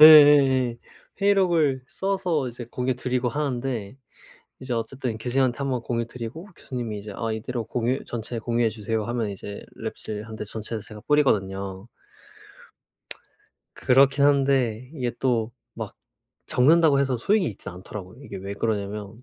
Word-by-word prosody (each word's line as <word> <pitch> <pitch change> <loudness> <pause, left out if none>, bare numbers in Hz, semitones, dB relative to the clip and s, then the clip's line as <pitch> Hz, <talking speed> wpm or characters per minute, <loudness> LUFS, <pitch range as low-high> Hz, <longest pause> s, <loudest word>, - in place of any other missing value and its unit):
예예예 145 -5 +9 0.4
회의록을 175 -9 +3
써서 185 -8 0
이제 120 0 -7
공유 125 +1 0
드리고 125 0 -1
하는데 130 -5 -2 0.6
이제 130 -1 -4
어쨌든 120 0 -3
교수님한테 125 +1 +1
1 140 -1 -1
번 125 -2 -1
공유 115 -1 -1
드리고 125 - -7
교수님이 120 -5 -4
이제 105 +1 -8
"아 115 +1 -2
이대로 115 +2 -3
공유 125 +3 -1
전체 120 0 -4
공유해 115 0 +1
주세요." 110 0 -2
하면 120 -2 -1
이제 100 +1 -7 0.2
랩실한테 110 0 -5
전체를 110 0 -4
제가 110 0 -11
뿌리거든요. 100 -9 +1 1.9
그렇긴 140 +2 +4
한데 135 -4 +2
이게 125 -4 -2
또 120 -3 +1 0.2
막 - - -5 0.5
적는다고 150 +2 +5
해서 135 -2 +1
소용이 195 - +2
있지는 95 - -5
않더라고요. 100 +4 -9
이게 140 - -7
왜 95 +1 -5
그러냐면 105 +1 -3
120 Hz, 330 characters per minute, -25 LUFS, 110-135 Hz, 1.9 s, 예예예